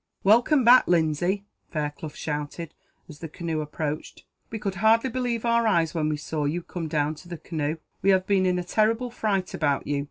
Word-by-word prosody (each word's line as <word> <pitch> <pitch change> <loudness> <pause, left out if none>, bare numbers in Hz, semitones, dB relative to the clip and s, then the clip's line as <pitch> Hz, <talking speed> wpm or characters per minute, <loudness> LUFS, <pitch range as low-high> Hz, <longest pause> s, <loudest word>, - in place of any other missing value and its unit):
"Welcome 240 +7 +4
back, 245 +2 +7
Lindsay!" 175 +4 +1 0.2
Fairclough 150 -1 -4
shouted, 150 +2 -5 0.3
as 150 -2 -12
the 165 - -7
canoe 165 -1 -3
approached; 150 0 -5 0.2
"we 225 - -4
could 200 -3 -3
hardly 230 +3 +4
believe 240 -2 -2
our 235 -1 +3
eyes, 170 -6 +2
when 155 -3 0
we 150 - -1
saw 150 0 -3
you 165 +4 -2
come 170 -2 -5
down 150 0 0
to 160 +3 -14
the 175 -1 -6
canoe. 155 -1 -3 0.2
We 195 - +2
have 190 -1 +4
been 190 -1 +2
in 180 0 +1
a 180 - -2
terrible 225 +6 +1
fright 200 -5 -1
about 145 -3 0
you. 145 0 -1
175 Hz, 195 wpm, -25 LUFS, 155-215 Hz, 0.3 s, back